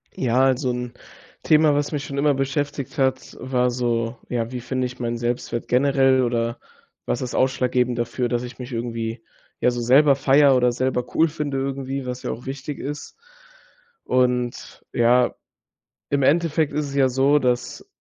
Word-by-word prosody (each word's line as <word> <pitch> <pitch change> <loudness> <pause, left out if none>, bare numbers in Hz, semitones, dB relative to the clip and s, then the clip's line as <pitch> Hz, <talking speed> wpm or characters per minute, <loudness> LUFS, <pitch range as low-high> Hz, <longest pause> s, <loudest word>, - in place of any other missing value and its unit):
Ja, 130 +1 +2
also 130 0 +1
'n 125 0 -5 0.5
Thema, 155 -1 +4
was 145 0 -1
mich 145 -2 -3
schon 140 -1 -6
immer 145 +1 +3
beschäftigt 140 +1 -3
hat, 130 -1 -1
war 125 -1 0
so: 120 -1 -1
Ja, 115 -1 -2
wie 125 - -4
finde 130 +1 -2
ich 125 - -12
meinen 120 -1 -2
Selbstwert 120 0 -3
generell, 135 0 +3
oder 115 -1 -1 0.5
was 120 - -2
ist 125 -2 -4
ausschlaggebend 125 -2 +1
dafür, 120 +1 -1
dass 120 0 -1
ich 125 0 -9
mich 125 +1 -7
irgendwie 115 -1 -4 0.4
ja - - +4
so 120 0 -3
selber 135 +4 +5
feiere 135 0 +4
oder 125 -1 +3
selber 125 0 -1
cool 165 - +4
finde, 145 -3 -3
irgendwie, 135 0 -3
was 125 0 -5
ja - - -2
auch 120 - -8
wichtig 135 +2 -6
ist. 145 +1 -6 0.9
Und 125 -1 -1
ja, 120 +1 +3 0.7
im 140 -1 +1
Endeffekt 160 +1 +2
ist 150 -1 -1
es 140 - -7
ja 135 -2 +4
so, 135 +3 +3
dass 125 -2 -2
130 Hz, 170 wpm, -22 LUFS, 120-140 Hz, 0.9 s, selber